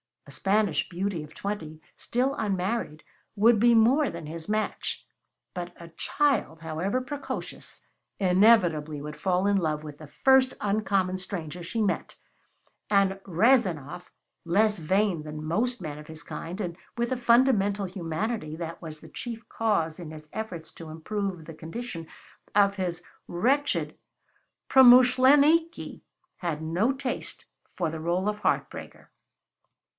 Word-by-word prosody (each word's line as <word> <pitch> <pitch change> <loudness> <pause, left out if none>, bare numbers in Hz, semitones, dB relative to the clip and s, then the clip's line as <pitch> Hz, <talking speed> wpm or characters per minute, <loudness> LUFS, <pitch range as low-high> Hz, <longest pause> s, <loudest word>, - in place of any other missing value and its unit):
A 140 - -13
Spanish 195 0 +1
beauty 185 -2 -3
of 150 0 -14
twenty, 160 -7 -5 0.2
still 255 +3 0
unmarried, 190 -5 -2 0.3
would 220 +1 +5
be 235 +1 +5
more 255 +6 +4
than 170 -1 -7
his 160 +1 -7
match. 215 0 -2 0.5
But 175 0 -5
a 170 -1 -10
child, 185 - 0
however 165 +10 -2
precocious, 280 +1 -6 0.3
inevitably 180 -6 +3
would 150 +1 -7
fall 185 0 +1
in 200 0 +3
love 155 -4 -1
with 150 -2 -9
the 155 - -10
first 265 - +4
uncommon 200 -3 +1
stranger 180 -3 -6
she 185 +7 -3
met; 205 - -2 0.7
and 195 -1 +3
Rezanov, 180 - +2 0.4
less 210 +4 +2
vain 185 +1 +1
than 150 0 -7
most 225 +9 -1
men 150 -3 -6
of 150 - -12
his 160 0 -10
kind, 175 +5 -7
and 175 -3 -4 0.2
with 235 +1 -1
a 255 - 0
fundamental 235 -5 +3
humanity 175 0 -3
that 165 0 -6
was 155 -3 -8
the - - -13
chief 235 -2 -7
cause 175 -8 0
in 170 -3 -7
his 155 -1 -11
efforts 185 -7 -5
to 165 -2 -9
improve 185 +2 -4
the 165 - -9
condition 165 +1 -7 0.5
of 200 -1 +4
his 175 -2 -3 0.2
wretched 265 +11 0 0.7
promuschleniki, 265 +6 +5 0.4
had 160 -3 -3
no 175 +10 +1
taste 265 -2 -5 0.3
for 160 - -1
the 160 - -5
role 175 +4 0
of 210 0 -3
heart - - +1
breaker. - - -11
190 Hz, 140 wpm, -27 LUFS, 160-225 Hz, 0.7 s, would